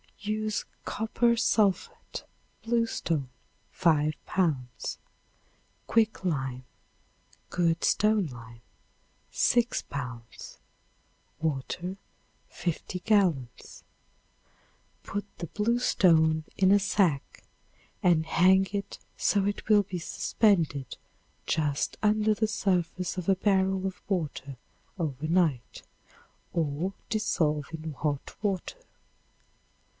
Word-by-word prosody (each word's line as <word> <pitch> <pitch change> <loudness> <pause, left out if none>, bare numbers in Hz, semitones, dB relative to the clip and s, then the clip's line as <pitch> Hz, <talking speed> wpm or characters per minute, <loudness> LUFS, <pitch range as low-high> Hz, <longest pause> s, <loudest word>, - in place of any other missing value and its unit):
Use 215 0 -2 0.2
copper 235 +2 +1
sulphate 210 -4 0 0.4
(bluestone) 225 - 0 0.4
5 155 -3 +2
pounds; 130 -10 -1 0.9
quick 220 -3 +2
lime 135 -7 -2 0.9
(good 170 -2 +1
stone 210 -3 +3
lime), 115 -3 -11 0.7
6 240 0 +2
pounds; 125 -4 -8 0.8
water, 160 +5 -3 0.5
50 180 +1 -3
gallons. 175 - 0 1.2
Put 205 0 -4
the 170 - -5
bluestone 170 -8 +3
in 190 0 +4
a 205 - +6
sack 190 -8 0 0.6
and 170 -3 +4
hang 190 +4 +4
it 200 -1 -4 0.2
so 200 -2 +2
it 205 0 -2
will 210 -1 +6
be 185 -2 -5
suspended 165 - +1 0.5
just 145 -2 0
under 215 0 +3
the 220 +1 +1
surface 180 -4 -1
of 180 - -4
a 195 - +5
barrel 190 -1 +1
of 190 +1 -7
water 145 -8 -3 0.4
over 155 -2 -2
night, 160 -8 0 0.7
or 165 +3 -1 0.2
dissolve 155 -9 0
in 160 -1 -6
hot 145 0 -3
water. 205 - -2
180 Hz, 90 wpm, -28 LUFS, 150-205 Hz, 1.2 s, a